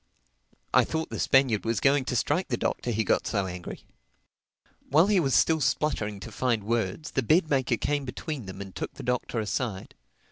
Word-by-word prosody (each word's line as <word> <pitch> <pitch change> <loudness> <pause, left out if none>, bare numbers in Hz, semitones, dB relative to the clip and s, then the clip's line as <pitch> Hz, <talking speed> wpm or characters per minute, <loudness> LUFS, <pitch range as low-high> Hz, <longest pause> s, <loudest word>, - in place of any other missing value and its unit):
I - - +6
thought 160 0 -3
the - - -4
Spaniard 135 -6 +3
was 115 -2 0
going 135 -1 +3
to 125 - -2
strike 150 +9 +1
the 120 - -1
Doctor 120 - -2
he 110 -1 +1
got - - +1
so 100 -3 0
angry. 90 -1 -7 1.0
While 155 +5 +5
he 205 -1 +3
was 135 -6 +1
still 160 -1 +3
spluttering 125 -7 0
to - - -8
find 120 -5 0
words, 115 +5 -2
the 135 - 0
bed 155 - +2
maker 130 -4 +2
came 145 +3 -1
between 130 -2 -5
them 95 - -7
and 95 -2 -8
took - - -5
the - - -8
Doctor 125 -1 -1
aside. 105 -1 -3
125 Hz, 190 wpm, -27 LUFS, 105-145 Hz, 1.0 s, I